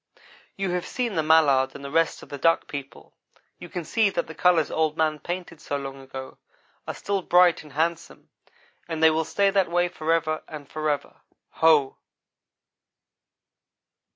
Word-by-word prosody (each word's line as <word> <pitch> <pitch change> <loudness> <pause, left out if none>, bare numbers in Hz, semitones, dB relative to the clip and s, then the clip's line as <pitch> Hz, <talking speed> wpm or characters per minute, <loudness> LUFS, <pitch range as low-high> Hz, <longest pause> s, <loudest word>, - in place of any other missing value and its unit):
You 195 -2 -1
have 180 0 -2
seen 245 -4 -2
the 165 - +1
mallard 145 -4 +4
and 140 - -9
the 140 - -6
rest 165 +1 +1
of - - -14
the 145 - -7
Duck 165 +4 +2
people. 140 -2 -9 0.5
You 175 - -10
can 175 -1 -5
see 220 +2 +2
that - - -2
the 160 - -9
colors 175 -2 +2
Old 160 -1 0
man 155 -1 +1
painted 175 -2 -6
so 145 - -3
long 135 -1 -7
ago 135 0 -9 0.5
are - - -4
still 200 -1 -2
bright 180 -1 +4
and 150 -3 -15
handsome, 165 +2 -3 0.6
and 160 -1 -3
they 160 - +7
will 160 +1 0
stay 200 +3 +2
that 195 -3 +2
way 175 +1 +1
forever 155 -1 -1
and 150 -3 -9
forever. 155 -1 -3 0.3
Ho!" 155 -4 +3
160 Hz, 165 wpm, -25 LUFS, 150-175 Hz, 0.6 s, they